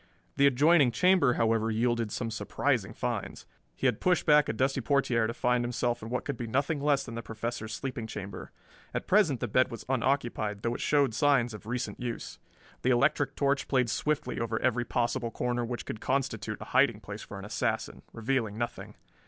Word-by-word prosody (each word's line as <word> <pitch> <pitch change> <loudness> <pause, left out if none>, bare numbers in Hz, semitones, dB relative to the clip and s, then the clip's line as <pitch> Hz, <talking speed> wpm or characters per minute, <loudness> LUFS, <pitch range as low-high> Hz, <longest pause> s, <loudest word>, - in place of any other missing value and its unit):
The 140 0 +5
adjoining 145 +1 +5
chamber, 165 +1 +4
however, 115 -1 +1
yielded 115 0 0
some 115 -2 -3
surprising 110 - -1
finds. - - -4 0.3
He - - -4
had 125 -5 +2
pushed 180 -2 +2
back 150 -1 +5
a - - 0
dusty 135 +4 0
portiere 120 -4 +2
to 115 - -3
find 125 -1 +1
himself 120 0 -1
in 110 - -7
what 125 - -2
could 140 - -3
be 120 - -4
nothing 140 +5 0
less 140 -1 +2
than 115 - -8
the 115 - -4
Professor's 110 -1 -5
sleeping 125 -4 -4
chamber. 100 -3 -7 0.4
At - - -2
present 180 - +3
the 120 - -1
bed 130 +4 +3
was 115 - -8
unoccupied, 120 -5 -1
though 115 - 0
it - - -5
showed 140 -5 +2
signs 125 -1 +2
of 105 0 -10
recent 125 +1 -3
use. 120 -2 -5 0.4
The 130 - +1
electric 135 +2 +2
torch 140 -1 +1
played 125 -4 +2
swiftly 150 -1 -1
over 115 -1 -1
every 120 -1 +1
possible 120 0 -1
corner 120 +1 -1
which 120 +1 -4
could 110 - -6
constitute 130 -4 -1
a - - -6
hiding - - +4
place - - -8
for - - -9
an - - -8
assassin, - - -2
revealing 115 -2 -1
nothing. 120 0 -5
120 Hz, 195 wpm, -29 LUFS, 115-140 Hz, 0.4 s, The